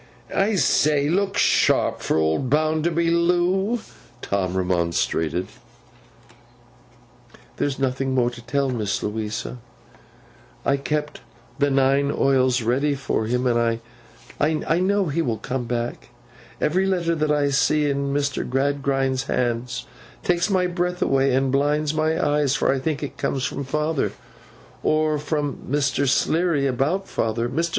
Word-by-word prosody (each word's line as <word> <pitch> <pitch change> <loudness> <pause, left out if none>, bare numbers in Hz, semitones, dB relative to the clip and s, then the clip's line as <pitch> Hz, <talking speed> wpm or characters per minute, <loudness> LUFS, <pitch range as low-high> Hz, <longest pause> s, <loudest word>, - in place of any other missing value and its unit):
'I 205 +2 +2
say! 150 -5 +2
Look 195 +3 0
sharp - - +3
for - - 0
old 80 +11 +1
Bounderby, 160 +3 +1
Loo!' 180 +6 +2 0.4
Tom 95 -2 -1
remonstrated. 85 -1 0 2.1
'There's 140 -2 -1
no 135 -2 0
more 125 -2 +1
to 120 -1 -10
tell, 135 +2 -1
Miss 105 -5 -2
Louisa. 110 +3 -4 1.1
I 140 - +2
keep 150 +1 -3 0.4
the 145 0 +3
nine 135 +1 +2
oils 130 -3 +2
ready 140 +5 +1
for 135 -5 -2
him, 125 +2 0
and 115 -2 +1 0.6
I 155 +2 +1
know 200 +2 +2
he 165 +1 -1
will 115 -7 -1
come 125 +3 -4
back. 120 0 -4 0.5
Every 185 +5 +1
letter 175 -3 +1
that 155 -2 0
I 145 -1 +2
see 150 +2 +2
in 140 0 -1
Mr. 140 -1 -1
Gradgrind's 135 0 0
hand 120 -1 -1 0.4
takes 175 +1 +1
my 185 -2 +2
breath 180 0 -1
away 135 0 +2
and 135 0 +1
blinds 145 +2 +1
my 155 +1 0
eyes, 145 -1 +1
for - - +2
I 135 - -1
think 150 +2 -2
it 145 - -6
comes 135 -1 -1
from 140 - -4
father, 150 +2 -1 0.7
or 155 -1 +1
from 150 -1 -2
Mr. 140 0 +1
Sleary 160 0 +2
about 140 +9 0
father. 115 +1 -1
Mr. 165 +7 -1
140 Hz, 135 wpm, -23 LUFS, 125-155 Hz, 2.1 s, sharp